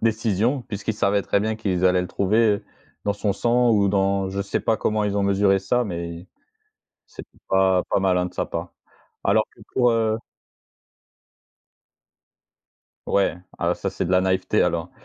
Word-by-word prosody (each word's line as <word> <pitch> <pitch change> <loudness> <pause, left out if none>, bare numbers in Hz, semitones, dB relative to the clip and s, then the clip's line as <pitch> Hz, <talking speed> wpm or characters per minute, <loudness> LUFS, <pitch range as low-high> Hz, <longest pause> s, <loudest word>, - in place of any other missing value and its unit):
décision, 115 +3 0
puisqu'il 105 0 -4
savait 100 -1 +1
très 100 - +1
bien 110 +1 -1
qu'ils 95 -5 -1
allaient 90 0 +4
le - - -4
trouver 105 +3 +1 0.4
dans 100 - +1
son 100 0 -1
sang 120 +4 +2
ou 100 -3 +3
dans 95 -1 +1
je 100 - -3
sais 100 - -2
pas 110 - +1
comment 110 0 0
ils 100 0 -1
ont 100 - +1
mesuré 100 0 +3
ça, 110 +6 0
mais 85 -2 -6 0.8
c'était - - -13
pas 95 -1 +3
pas - - +2
malin 90 -2 +1
de 90 - -14
sa - - -1
part. - - -5 0.5
Alors - - +3
que - - -19
pour, 125 -1 +3
heu 110 -1 +1 2.9
Ouais, 100 -3 +1 0.2
ah - - +1
ça, - - -4
c'est - - -3
de 90 - -3
la 90 - +4
naïveté 95 0 +1
alors. 85 +1 -1
100 Hz, 165 wpm, -23 LUFS, 95-110 Hz, 2.9 s, allaient